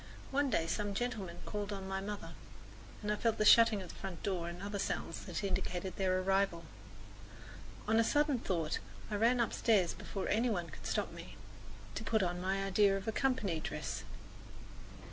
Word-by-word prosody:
One 280 +1 +2
day 165 -8 +2
some 205 +4 -2
gentlemen 200 -7 -3
called 205 0 -3
on 195 -1 -4
my 190 0 -2
mother, 205 +1 -5 0.7
and 210 - 0
I - - +2
felt 225 +1 +1
the 215 - +2
shutting 225 -3 +7
of 180 - -9
the - - -8
front 190 -4 -6
door 175 -4 -1
and 175 +1 -7
other 200 +1 -4
sounds 165 - -2
that 175 -1 -3
indicated 185 -1 -2
their 185 -1 +2
arrival. 195 -3 +1 1.2
On 220 +1 +4
a - - +6
sudden 290 +2 +2
thought 165 -7 -1 0.3
I - - 0
ran 235 +4 +3
upstairs 220 -5 +3
before 195 - -5
any 230 +4 +2
one 175 -6 -2
could - - -8
stop - - 0
me, - - -10 0.6
to - - -4
put 220 -3 +2
on 175 0 -1
my 195 +1 0
idea 195 0 +4
of 195 - -7
a - - +2
company 220 - +1
dress. - - -4
200 Hz, 185 wpm, -34 LUFS, 185-220 Hz, 1.2 s, shutting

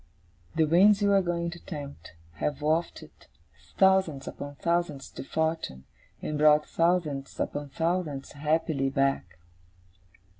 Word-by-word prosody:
The 160 - +4
winds 195 +6 +5
you 200 - +4
are 195 - +5
going 170 -1 -2
to 175 - -9
tempt, 145 - -8 0.2
have 150 - -2
wafted 160 +3 -1 0.7
thousands 190 -7 +3
upon 145 0 -7
thousands 170 -4 -1
to - - -7
fortune, 160 - -2 0.4
and 150 -1 -3
brought 150 0 +5
thousands 165 -5 0
upon 145 -1 -3
thousands 160 -2 -2
happily 150 -2 0
back. 135 -11 0
155 Hz, 120 wpm, -28 LUFS, 140-170 Hz, 0.7 s, winds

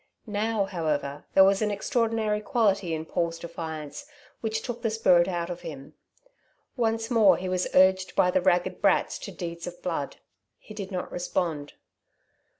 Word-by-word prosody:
Now, 215 -1 0
however, 150 -6 -2
there 190 - +9
was 195 +1 +4
an 215 - +1
extraordinary 220 0 0
quality 200 - +1
in 160 0 -5
Paul's 170 0 -1
defiance 160 - -7 0.3
which 220 -1 -2
took 240 -1 -5
the 230 - 0
spirit 185 -6 +4
out 175 -1 -2
of 175 - -6
him. 150 -3 -9 0.8
Once 225 -1 -1
more 210 -7 +6
he 185 - -4
was 185 0 0
urged 185 0 +4
by 180 - +4
the 185 - +2
ragged 180 0 +1
brats 200 - +2
to - - -7
deeds 170 -1 -6
of 175 0 -9
blood. 165 -6 -3 0.4
He 215 - -13
did 200 -3 -6
not 180 -1 -4
respond. 165 -4 -2
185 Hz, 160 wpm, -27 LUFS, 170-215 Hz, 0.8 s, there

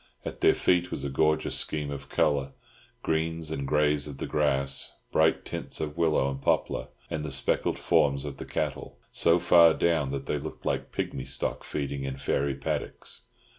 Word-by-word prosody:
At - - -6
their - - +5
feet 90 0 +2
was 70 - -4
a 70 - -2
gorgeous 75 +3 +2
scheme 75 -2 -2
of 70 0 -7
colour, 70 -1 +1 0.5
greens 80 0 -1
and 70 -3 -3
greys 75 0 +3
of 70 -2 -7
the - - -3
grass, 70 -2 0
bright 80 +1 +3
tints - - -3
of 75 -1 -3
willow 80 -5 +2
and 70 0 -4
poplar, - - 0 0.2
and 75 - -2
the 75 - -3
speckled - - +1
forms 70 0 +2
of 70 -2 -6
the - - -7
cattle, - - -3
so 85 +1 +4
far 85 -2 +6
down 80 -5 +1
that 70 0 -4
they 75 - -1
looked 80 +2 -8
like - - -1
pigmy 65 - -3
stock 65 0 -3
feeding 70 -1 -3
in 65 -1 -4
fairy 70 0 0
paddocks. 70 - -4
75 Hz, 180 wpm, -28 LUFS, 70-80 Hz, 0.5 s, far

